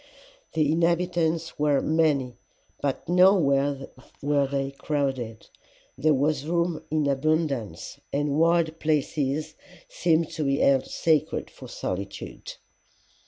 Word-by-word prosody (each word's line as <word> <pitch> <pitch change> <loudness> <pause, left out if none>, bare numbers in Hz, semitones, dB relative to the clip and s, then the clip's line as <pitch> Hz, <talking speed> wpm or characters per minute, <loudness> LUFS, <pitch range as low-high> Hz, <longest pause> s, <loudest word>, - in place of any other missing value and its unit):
"'The 155 -2 +2
inhabitants 170 -1 0
were 145 -2 +3
many, 150 -6 +1 0.5
but 140 -2 -2
nowhere 145 -7 +3 0.4
were 145 -1 +2
they 135 0 -2
crowded. 135 -6 -3 0.5
There 155 -1 +2
was 145 +1 0
room 170 -1 0
in 155 -1 +1
abundance, 140 - -1
and 145 +1 0
wild 165 -1 +2
places 150 0 -1 0.3
seemed 165 -2 +1
to 155 - -3
be 140 -1 +1
held 135 -2 +3
sacred 160 -3 0
for - - -12
solitude. 100 +1 -6
150 Hz, 110 wpm, -26 LUFS, 140-160 Hz, 0.5 s, were